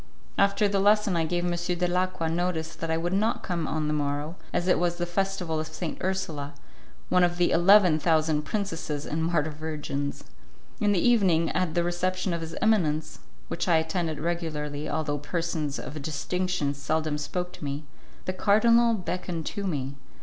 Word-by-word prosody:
After 200 +1 +3
the 200 -1 +1
lesson 205 -1 +4
I 165 -1 +2
gave 175 +1 0
M. 175 - +1
Dalacqua 180 0 0
notice 165 -1 -1
that 165 - -5
I 160 - +1
would 175 +2 -1
not 215 +4 +1
come 170 -4 -2
on 155 -1 -1
the 150 - 0
morrow, 145 +2 -1 0.2
as 175 - 0
it 180 - +4
was 175 0 +1
the 175 - -2
Festival 180 -2 -1
of 155 - -3
St. 160 +1 -5
Ursula, 155 -7 -2 0.5
one 180 0 +4
of 175 0 +2
the 175 0 +3
eleven 180 -2 +6
thousand 155 -1 +2
princesses 165 -6 -3
and 160 +2 -2
martyr 160 -2 +1
virgins. 150 -2 -4 0.6
In 210 -3 +3
the 195 +3 +2
evening, 185 -9 +4
at 180 -4 -1
the 175 - +3
reception 185 +1 -1
of 170 - -2
his 165 0 -6
eminence, 155 -8 +1 0.3
which 170 - -3
I 170 - +5
attended 160 -1 -1
regularly, 155 -3 -3
although 145 -2 -1
persons 155 -1 -2
of 150 +1 -6
distinction 160 +1 -1
seldom 150 +1 -1
spoke 180 +4 -3
to 180 - -10
me, 140 +1 -3 0.4
the 185 - -1
cardinal 230 +4 +4
beckoned 180 -4 -4
to 200 -2 -3
me. 140 -5 -2
170 Hz, 175 wpm, -27 LUFS, 155-185 Hz, 0.6 s, eleven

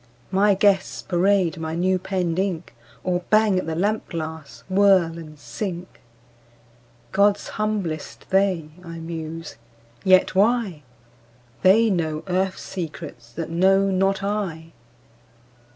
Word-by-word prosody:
—My 200 +1 +4
guests 195 0 +2
parade 185 -1 +2
my 160 0 -3
new 185 +2 +1
penned 180 -2 -1
ink, 180 -8 -2 0.3
Or 180 -1 0
bang 215 -3 +4
at 185 - -5
the 160 - -2
lamp 205 +6 -1
glass, 160 -3 -6
whirl, 190 -4 +3
and 155 -2 -11
sink. 175 - -6 1.1
"God's 200 +1 +2
humblest, 205 -8 -3
they!" 190 -5 +1
I 165 -1 -8
muse. 165 -2 -6 0.5
Yet 185 0 +5
why? 205 -4 +2 0.8
They 215 +4 +5
know 160 -4 -1
Earth 185 +1 0
secrets 155 -9 -7
that 165 +2 -5
know 195 +3 +3
not 195 +1 +1
I. 180 -6 -3
185 Hz, 120 wpm, -23 LUFS, 165-195 Hz, 1.1 s, Yet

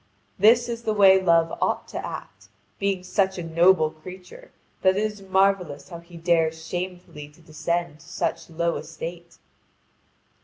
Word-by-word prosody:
This 235 +4 +5
is 235 -1 -4
the 215 -2 -1
way 190 -2 +6
Love 165 -2 +3
ought - - 0
to - - -5
act, - - -8 0.3
being 195 -2 -1
such 190 0 0
a 175 - -4
noble 165 -1 +3
creature 185 - -12 0.3
that 190 0 +3
it 210 - +1
is 210 -2 -4
marvellous 190 -6 0
how 170 - -8
he 170 0 -14
dares 165 -1 +1
shamefully 175 -4 -6
to 150 +3 -22
descend 170 0 -3
to - - -16
such - - -3
low 170 +1 -1
estate. 170 +1 -8
175 Hz, 155 wpm, -24 LUFS, 165-190 Hz, 0.3 s, way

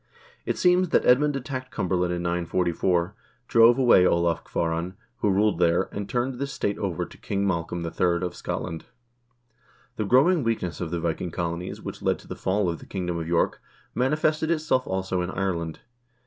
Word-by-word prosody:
It - - -1
seems 180 0 +3
that - - +2
Edmund 145 +4 +4
attacked 130 -1 -5
Cumberland 90 -5 -1
in 85 0 -2
944, 85 +1 0 0.3
drove 115 +1 +6
away 120 -8 +6
Olav 85 -2 +2
Kvaaran, 85 +2 -2 0.2
who 105 - +1
ruled 100 -1 +2
there, 85 +1 +2
and 100 0 -5
turned 125 +1 -1
this 140 0 -3
state 100 -5 -2
over 95 -5 -2
to - - -15
King 100 0 -2
Mal 85 -4 0
colm 85 -1 -4
III. 85 +1 0
of 90 - -4
Scotland. 80 -1 -5 1.1
The 110 - -1
growing 140 - +4
weakness 110 -9 -2
of 85 - -2
the 85 +1 -2
Viking 85 +1 -2
colonies, 85 +2 -4
which - - -7
led - - +1
to - - -17
the - - -6
fall 95 +1 0
of 85 -2 -2
the - - -13
kingdom 90 -3 -3
of 80 - -4
York, 85 0 +1 0.3
manifested 155 +4 +1
itself 155 -6 +1
also 95 -1 -1
in 90 - -3
Ireland. 85 -5 -3
95 Hz, 180 wpm, -25 LUFS, 85-125 Hz, 1.1 s, drove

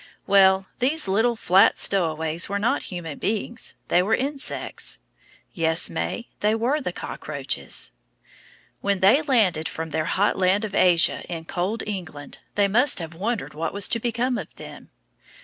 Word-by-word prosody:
Well, 190 -1 +5
these 280 +1 0
little 225 +5 +2
flat 195 0 +4
stowaways 160 -3 +1
were 200 - -1
not 220 +4 +1
human 170 -5 -6
beings, 225 +3 -2
they 175 - +4
were 215 +5 +2
insects. 275 +1 -2 0.6
Yes, 160 0 +1
May, 240 - -3
they 210 +1 +2
were 255 +7 0
the - - -3
cockroaches. - - -3 0.9
When 200 -2 -1
they 215 +10 +6
landed 215 - +2
from 160 0 -6
their 155 0 -1
hot 195 +6 +1
land 190 +3 +2
of 205 - -7
Asia 175 -3 +4
in 165 -2 -5
cold 185 +7 -2
England, 170 -8 -7 0.2
they 205 -1 +3
must 245 +8 +3
have 165 -3 -5
wondered 210 +6 -3
what 160 +2 -3
was 200 -1 +2
to 230 - 0
become 240 +2 -1
of - - -9
them. - - -11
200 Hz, 155 wpm, -24 LUFS, 170-230 Hz, 0.9 s, they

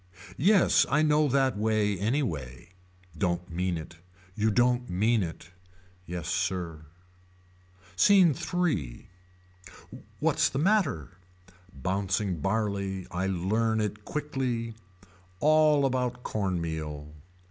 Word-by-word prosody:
Yes 195 +5 +5
I 150 +3 +3
know 150 0 +3
that 135 -2 +2
way 105 -1 +1
anyway. 90 - -2 0.5
Don't 90 +1 -2
mean 90 +1 -1
it. 80 +1 -9 0.4
You 110 +3 +1
don't 125 +2 +2
mean 110 +5 +2
it. 85 -1 -6 0.6
Yes 85 -2 -5
sir. 85 -3 -2 1.1
SCENE 185 - +5 0.2
III. 150 - -2 1.1
What's - - +2
the 135 - -5
matter. 145 - 0 0.5
Bouncing 95 +4 -2
barley 100 0 -2
I 90 +2 -1
learn 110 +5 0
it 105 0 -3
quickly. 130 -5 -3 0.7
All 155 0 +4
about 125 -1 -1
corn 95 -4 -1
meal. 75 -2 -5
105 Hz, 105 wpm, -28 LUFS, 90-130 Hz, 1.1 s, Yes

